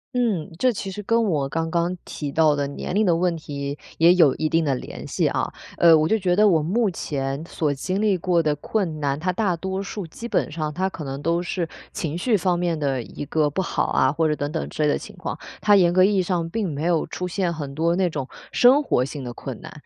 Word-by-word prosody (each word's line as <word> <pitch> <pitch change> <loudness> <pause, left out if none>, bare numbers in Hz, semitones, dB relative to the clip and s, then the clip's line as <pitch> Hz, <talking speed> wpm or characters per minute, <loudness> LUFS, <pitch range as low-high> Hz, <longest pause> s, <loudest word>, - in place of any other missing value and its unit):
嗯， 210 -12 0
这 255 +2 +2
其 195 -1 -5
实 210 +2 -6
跟 230 +2 +2
我 150 -9 0
刚 165 +3 -2
刚 175 +1 0
提 145 -2 -5
到 155 -1 +4
的 140 -1 -1
年 140 +6 -5
龄 215 0 +3
的 170 -2 +3
问 170 -1 +1
题， 140 -1 -5 0.2
也 170 +2 +7
有 160 -7 +5
一 155 - 0
定 165 -1 +2
的 140 - +2
联 125 - -7
系 - - +1
啊。 - - -1 0.2
呃， 165 -1 +7
我 155 0 +3
就 220 - +3
觉 180 -3 +1
得 210 +1 +5
我 160 -6 +3
目 210 +5 +1
前 140 -2 -3
所 150 -4 -1
经 185 +9 -2
历 205 -4 +2
过 175 -1 +2
的 150 -2 +1
困 165 -1 -2
难， 140 0 -1
它 180 +2 0
大 185 -2 0
多 190 +3 -3
数 195 -3 -6
基 230 +8 -8
本 165 - 0
上 155 -1 -3
它 190 +3 0
可 160 - -8
能 135 +1 -5
都 170 +2 0
是 175 -2 -3 0.2
情 160 +1 -3
绪 220 +4 +2
方 180 -2 +1
面 170 -3 -1
的 135 -4 -1
一 145 - -8
个 150 -2 +1
不 190 - -1
好 - - -1
啊， 130 +1 +3
或 160 +1 +1
者 150 - +1
等 145 +1 -3
等 160 - -3
之 - - -5
类 150 - +3
的 - - +2
情 - - -10
况， - - -5 0.2
它 205 - +5
严 175 -3 +4
格 185 - +5
意 200 +1 +3
义 185 - +2
上 170 -2 -1
并 210 0 -2
没 150 +4 -3
有 170 -2 +2
出 180 - -5
现 180 -1 -1
很 145 -4 -6
多 170 +3 +1
那 185 -1 +2
种 140 -4 -4 0.2
生 260 +4 +6
活 125 - +1
性 140 -1 -6
的 120 - -5
困 - - -7
难。 - - -9
170 Hz, 275 characters per minute, -23 LUFS, 150-190 Hz, 0.2 s, 也